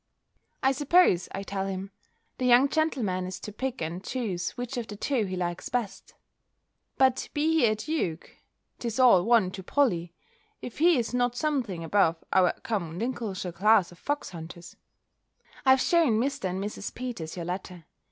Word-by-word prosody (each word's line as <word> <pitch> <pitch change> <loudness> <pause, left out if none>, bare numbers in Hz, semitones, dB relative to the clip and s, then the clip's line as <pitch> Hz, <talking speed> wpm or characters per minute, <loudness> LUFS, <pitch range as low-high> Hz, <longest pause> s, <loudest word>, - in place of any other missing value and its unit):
"I 265 - +5
suppose," 290 - +3
I 195 - -5
tell 195 -1 -3
him, 195 +1 -5 0.5
"the 255 - +1
young 250 +3 +6
gentleman 235 - 0
is 185 0 -6
to 210 - -6
pick 255 -2 -4
and 170 +4 -5
choose 195 -8 -2
which 245 +2 -4
of 240 -2 -4
the 205 - -7
two 235 +1 0
he 185 -1 -4
likes 175 -1 -3
best." 240 -5 -4 0.8
But 260 -1 +2
be 320 +2 +2
he 245 - +5
a 215 - +2
duke, 215 - -3 0.5
'tis 230 -2 -3
all 240 -9 +6
one 225 -4 +3
to 190 - -7
Polly, 175 -7 0 0.4
if 245 - -8
he 335 -1 +5
is 235 0 -2
not 245 -1 +1
something 245 - -1
above 165 -2 +2
our 185 -2 +5
common 175 -7 -3
Lincolnshire 210 -5 -3
class 195 +1 +3
of 175 - -16
fox 290 -6 -3
hunters. 170 0 -10 0.9
I - - +7
have 260 0 +7
shewn 320 -11 +3
Mr. 270 -4 -1
and 185 0 -2
Mrs. 205 0 -6
Peters 235 -11 -5
your 175 -2 -5
letter. 180 -1 -6
210 Hz, 170 wpm, -27 LUFS, 180-255 Hz, 0.9 s, I